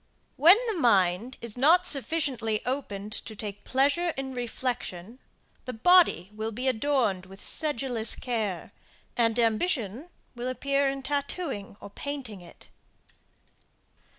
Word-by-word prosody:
When 335 +8 +7
the 435 -7 -2
mind 205 - +2
is 235 0 -5
not 340 +7 +5
sufficiently 265 -8 +1
opened 215 -6 -4
to 220 - -6
take 205 -1 -7
pleasure 285 +7 +1
in 265 -1 -4
reflection, 240 -4 -4 0.5
the 255 - -5
body 235 - +4
will 220 +1 -4
be 250 +4 -4
adorned 230 -7 0
with 195 +1 -13
sedulous 250 -6 +1
care; 220 -8 -3 0.4
and 230 -1 +2
ambition 235 - 0 0.3
will 240 +1 -4
appear 275 +2 0
in 270 0 -5
tattooing 280 - -3
or 200 - -11
painting 255 -7 -6
it. 175 - -15
245 Hz, 125 wpm, -27 LUFS, 215-280 Hz, 0.5 s, When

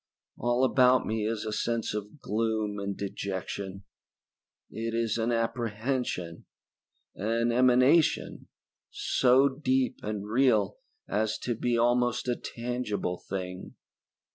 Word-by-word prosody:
All 120 +1 +1
about 130 -1 +4
me 110 -1 -1
is 110 -1 -2
a 110 - -3
sense 115 0 -1
of 105 +7 -6
gloom 110 -1 -1
and 100 0 -3
dejection. 95 0 -5 0.9
It 115 +1 -3
is 115 -1 0
an 115 +2 +1
apprehension 115 -5 -2 0.7
an 115 +3 0
emanation 130 +6 +3 0.4
so 130 +2 +3
deep 130 -3 0
and 105 -1 -4
real 110 -4 +2 0.3
as 110 +1 0
to 120 - 0
be 120 +1 0
almost 120 +1 +2
a 125 - +1
tangible 115 -8 -3
thing. 90 -1 -5
115 Hz, 115 wpm, -28 LUFS, 105-125 Hz, 0.9 s, about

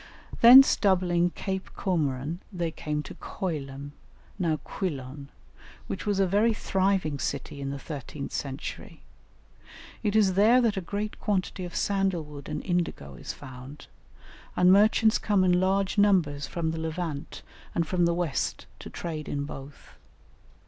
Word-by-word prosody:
Thence 255 +3 +10
doubling 180 -3 +2
Cape 190 +1 -4
Comorin 155 -3 -1
they 175 -4 -2
came 150 -1 -3
to - - -9
Coilum, 145 -5 -5 0.5
now 165 -4 +1
Quilon, 140 -6 -5 0.6
which - - -5
was 205 -2 +1
a 195 - +4
very 210 +5 +2
thriving 190 -8 0
city 140 +2 -4
in 135 - -3
the 140 - -4
thirteenth 140 0 -7
century. 135 -1 -6 1.0
It 210 -2 -1
is 205 -4 +4
there 215 +6 +5
that 230 -4 +2
a 190 - -2
great 205 +4 -4
quantity 190 -2 -1
of 175 - -9
sandal 195 -4 0
wood 145 -2 -10
and - - -4
indigo 175 - -2
is 65 - -7
found, 130 +1 -11 0.7
and 180 +1 +6
merchants 215 +2 +4
come 205 -3 +2
in 180 -1 +4
large 195 +2 +1
numbers 165 -9 +3
from 165 -2 -2
the 160 - -4
Levant 160 -2 -4 0.3
and 170 - +1
from 175 +1 +1
the 170 0 +2
West 170 -6 -2
to - - -9
trade 155 -3 -5
in 140 -1 -2
both. 140 0 -10
175 Hz, 150 wpm, -27 LUFS, 145-195 Hz, 1.0 s, Thence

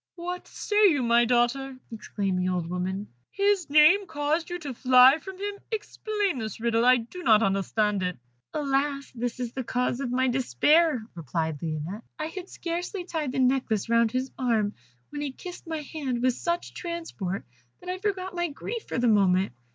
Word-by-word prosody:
"What 355 +1 -5
say 415 0 +3
you, 290 -8 +2
my 235 0 +4
daughter?" 250 +3 +1
exclaimed 200 -4 -2
the 180 0 0
old 180 -2 -1
woman; 185 +3 -3 0.2
"his 400 -4 +1
name 310 +7 +6
caused 300 +3 -1
you 350 - -3
to 290 -6 -6
fly 255 +4 +6
from 380 +1 -9
him? 405 +1 -4
Explain 420 - -2
this 220 -2 -5
riddle 230 0 +1
I 250 +1 +6
do 240 +10 -7
not 225 -8 +5
understand 195 +1 +1
it." 180 -1 -2 0.3
"Alas! 280 -1 -1
this 245 0 -3
is 245 -1 -4
the 260 - -3
cause 250 +1 -1
of 275 -3 -2
my 260 +1 +1
despair," 265 - +3
replied 160 -2 -3
Lionette. 160 +6 -4 0.2
"I 310 - -3
had 355 +3 -7
scarcely 355 +3 -4
tied 315 -6 -2
the - - -3
necklace 250 -5 +1
round 230 -1 +3
his 255 +2 -2
arm, 220 -5 +1 0.4
when 290 0 -5
he 290 -2 -2
kissed 355 +5 -10
my 320 -2 -3
hand 265 -5 -3
with 255 -1 +3
such 340 +7 -3
transport 330 - -5 0.3
that 360 - -9
I 365 0 -3
forgot 380 -2 -2
my 345 -1 0
grief 435 +10 -6
for - - -3
the 245 0 +2
moment. 190 - +3
260 Hz, 180 wpm, -27 LUFS, 220-340 Hz, 0.4 s, name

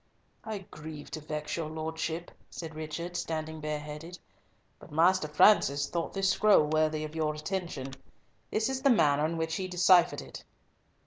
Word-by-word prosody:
"I 210 -4 -5
grieve 150 -1 -9
to 155 - -5
vex 150 0 -4
your 165 -2 -3
lordship," 160 +1 -4 0.2
said 160 -2 -7
Richard, 160 +3 -5
standing 160 -2 -3
bareheaded, 150 +3 -5 0.6
"but - - -14
Master 165 +1 +3
Francis 145 -3 +4
thought 170 -1 -3
this 195 -1 +1
scroll 210 -7 +5
worthy 155 0 +1
of 155 0 -6
your 155 -1 0
attention. 155 -5 -4 0.6
This 220 +1 0
is 265 0 -2
the 275 - +4
manner 150 - +4
in 165 +1 -3
which 160 0 -1
he 190 - -3
deciphered 180 -1 +4
it." - - -10
160 Hz, 155 wpm, -30 LUFS, 150-180 Hz, 0.6 s, scroll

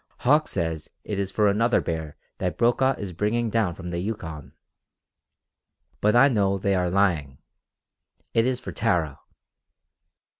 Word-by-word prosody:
Hauck 150 +4 +4
says 80 -2 -3
it 105 -2 -3
is 100 -1 -1
for 105 +1 +2
another 115 +4 +3
bear 80 -3 -4 0.2
that 90 -4 -2
Brokaw 130 +3 +3
is 100 -3 -6
bringing 110 +5 0
down 105 -7 +1
from 90 -1 -7
the 85 0 -3
Yukon. 80 -7 -5 1.5
But 105 +2 +2
I 130 +3 +7
know 100 -6 +1
they 100 +1 0
are 90 -1 +1
lying. 85 -8 +1 1.0
It 115 +2 +3
is 130 -1 0
for - - -7
Tara." 85 - 0
100 Hz, 145 wpm, -25 LUFS, 85-115 Hz, 1.5 s, I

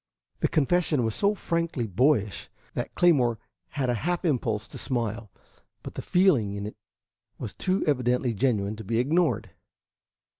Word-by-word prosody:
The - - +2
confession 155 -2 +2
was 110 -1 0
so 200 - +2
frankly 170 - -1
boyish 110 - +1 0.2
that - - -4
Claymore 130 -10 +4 0.3
had 135 +2 -2
a 125 - +2
half 175 +3 -1
impulse 115 -8 0
to - - -9
smile, 115 -4 -2 0.5
but - - -7
the - - -5
feeling 140 - +3
in 100 0 -4
it 105 - -6 0.6
was 110 - -6
too 190 +1 0
evidently 125 -4 +1
genuine 105 -2 0
to 110 - -7
be 115 +3 -1
ignored. 155 +7 +1
125 Hz, 150 wpm, -27 LUFS, 110-165 Hz, 0.6 s, Claymore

